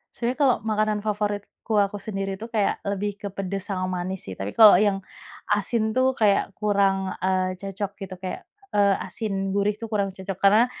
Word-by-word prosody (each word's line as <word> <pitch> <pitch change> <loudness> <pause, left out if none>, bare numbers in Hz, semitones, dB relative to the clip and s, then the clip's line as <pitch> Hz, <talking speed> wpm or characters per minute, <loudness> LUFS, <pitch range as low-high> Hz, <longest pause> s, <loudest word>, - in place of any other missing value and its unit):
Sebenarnya 245 +2 -2
kalau 260 -3 +5
makanan 215 -1 +1
favoritku, 210 +1 -2
aku 205 0 +1
sendiri 195 -2 -3
itu 225 +4 -8
kayak, 215 -4 0
lebih 200 +1 -2
ke 205 0 -6
pedes 195 0 -4
sama 185 -1 -1 0.2
manis, 190 +1 -5
sih. 95 - -6
Tapi, 95 +2 -4
kalau 215 -2 +10
yang 200 +1 +3 0.6
asin 220 +2 0
tuh, 260 +1 +2
kayak 205 -3 +3
kurang, 195 -2 +1
eee, 185 0 +1
cocok 195 +2 -5
gitu, 195 -2 -8
kayak, 185 0 -5 0.3
eee, 200 -1 +4
asin 195 -3 -3
gurih 205 +1 +2
itu 230 - -5
kurang 200 -3 -1
cocok. 190 +1 -6
Karena 210 +4 +6
200 Hz, 180 wpm, -25 LUFS, 195-215 Hz, 0.6 s, kalau